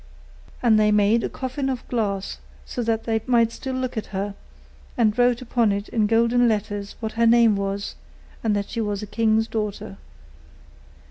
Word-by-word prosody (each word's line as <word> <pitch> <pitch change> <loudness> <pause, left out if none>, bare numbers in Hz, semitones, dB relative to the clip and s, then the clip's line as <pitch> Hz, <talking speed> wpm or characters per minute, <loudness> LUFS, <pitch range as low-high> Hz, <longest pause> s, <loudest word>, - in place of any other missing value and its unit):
And 220 -3 +5
they 210 0 +4
made 210 +2 +3
a - - -1
coffin 265 +1 -3
of 255 -2 -4
glass, 200 -5 -2 0.3
so 245 - -4
that 225 -1 0
they 225 -1 0
might 235 -2 +3
still 260 +2 -5
look 255 -1 -3
at 220 - -3
her, 200 +1 -3 0.6
and 215 -3 +3
wrote 245 0 +2
upon 235 -3 +2
it 200 +1 -3
in 215 -3 +1
golden 235 +2 +3
letters 205 -2 -2
what 220 -1 -3
her 230 +1 +2
name 230 -2 +5
was, 200 0 -3 0.5
and 215 -2 +1
that 200 0 -3
she 230 - -2
was 205 -1 -2
a - - -3
king's 220 +1 +1
daughter. 210 -2 -4
225 Hz, 180 wpm, -23 LUFS, 205-235 Hz, 0.6 s, And